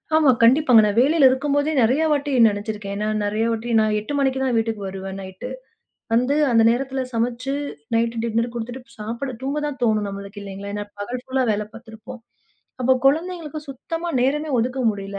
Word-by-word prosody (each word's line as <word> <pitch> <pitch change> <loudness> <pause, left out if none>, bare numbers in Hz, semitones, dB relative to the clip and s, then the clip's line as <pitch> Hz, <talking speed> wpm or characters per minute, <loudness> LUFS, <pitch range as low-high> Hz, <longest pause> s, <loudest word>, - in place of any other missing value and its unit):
ஆமா, 310 -3 +5
கண்டிப்பாங்க. 250 -2 +6
நான் 205 +2 -1
வேலையில 285 +1 +5
இருக்கும்போதே 285 +3 0
நெறைய 255 +8 +3
வாட்டி 285 0 0 0.2
நினைச்சிருக்கேன். 205 -1 -5
ஏன்னா 210 +1 -2 0.2
நிறைய 215 +2 0
வாட்டி 230 +1 -3
நான் 215 -1 +2
8:00 215 +8 -6
மணிக்குத்தான் 265 -2 +1
வீட்டுக்கு 225 -2 -1
வருவேன் 190 0 -6
நைட். 190 +6 -8 0.7
வந்து 250 +5 +2 0.2
அந்த 230 -1 +5
நேரத்துல 265 +2 -1
சமைச்சு 240 +3 -1 0.4
நைட் 230 0 +1
டின்னர் 230 +1 0
குடுத்திட்டு 240 +1 -7
சாப்பிட 235 +5 -4
தூங்க 280 +3 -2
தான் 285 -2 -5
தோணும் 215 -3 +2
நம்மளுக்கு 200 +1 -8
இல்லைங்களா? 200 0 -7
ஏன்னா 205 0 -3
பகல் 245 +5 -5
ஃபுல்லா 260 0 0
வேலை 210 0 0
பார்த்திருப்போம். 230 +1 -11 0.6
அப்போ 255 +1 +4
குழந்தைகளுக்குச் 315 -1 -1
சுத்தமா 330 +6 -5
நேரமே 295 +4 0
ஒதுக்க 255 +3 -1
முடியல. 200 -1 -6
235 Hz, 160 wpm, -22 LUFS, 215-270 Hz, 0.7 s, கண்டிப்பாங்க